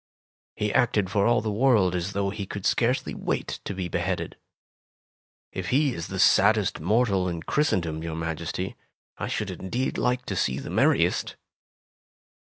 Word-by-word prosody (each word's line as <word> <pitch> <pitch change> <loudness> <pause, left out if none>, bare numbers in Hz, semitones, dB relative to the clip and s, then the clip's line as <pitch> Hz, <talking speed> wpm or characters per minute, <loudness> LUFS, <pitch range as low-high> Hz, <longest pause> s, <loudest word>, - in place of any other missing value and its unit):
He 105 -1 -1
acted 105 -6 +2
for 100 0 +2
all 120 -1 +3
the 110 0 -2
world 105 -5 +3
as 90 +2 -2
though 100 0 0
he 100 -2 -5
could 100 0 -6
scarcely 125 +2 +1
wait - - -3
to 100 - -4
be 95 -1 -3
beheaded. 85 +1 -2 1.2
If - - -5
he 140 0 +2
is 85 -4 -5
the 95 - -5
saddest 100 +2 +4
mortal 100 0 +2
in 85 -2 -5
Christendom, 85 - 0
your 80 -1 -4
Maj 80 -1 -3
esty, - - -4 0.4
I - - -2
should - - -2
indeed 120 +8 -3
like 125 0 0
to 100 - -3
see 65 -6 0
the - - -6
merriest!" - - +2
100 Hz, 165 wpm, -26 LUFS, 90-115 Hz, 1.2 s, saddest